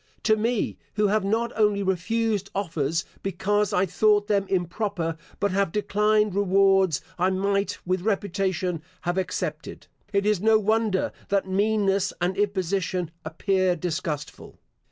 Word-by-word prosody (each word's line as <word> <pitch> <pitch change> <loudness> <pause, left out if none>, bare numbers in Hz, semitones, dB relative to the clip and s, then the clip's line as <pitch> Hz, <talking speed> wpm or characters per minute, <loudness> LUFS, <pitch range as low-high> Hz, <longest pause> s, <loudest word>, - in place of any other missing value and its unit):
To 220 - +4
me, 225 +1 -1 0.2
who 210 -1 +2
have 215 0 +2
not 225 +4 0
only 210 -2 +2
refused 200 +2 0
offers, 165 -3 -1 0.2
because 200 +2 0
I 185 - +2
thought 205 +3 +3
them 200 -2 +1
improper, 180 -2 -1 0.2
but 200 -1 +1
have 195 -2 +1
declined 210 +1 +2
rewards 195 -3 +3 0.2
I 185 +2 +3
might 200 +1 0
with 185 0 0
reputation 190 -4 -1 0.2
have 175 +1 -1
accepted, 185 - -4 0.3
it 200 -1 +1
is 210 -3 +2
no 220 +1 +5
wonder 215 -2 +1 0.2
that 200 -1 +1
meanness 200 0 +1
and 180 +1 0
imposition 190 -3 -1
appear 185 +3 +1
disgustful. 155 -3 -4
195 Hz, 135 wpm, -25 LUFS, 185-210 Hz, 0.3 s, no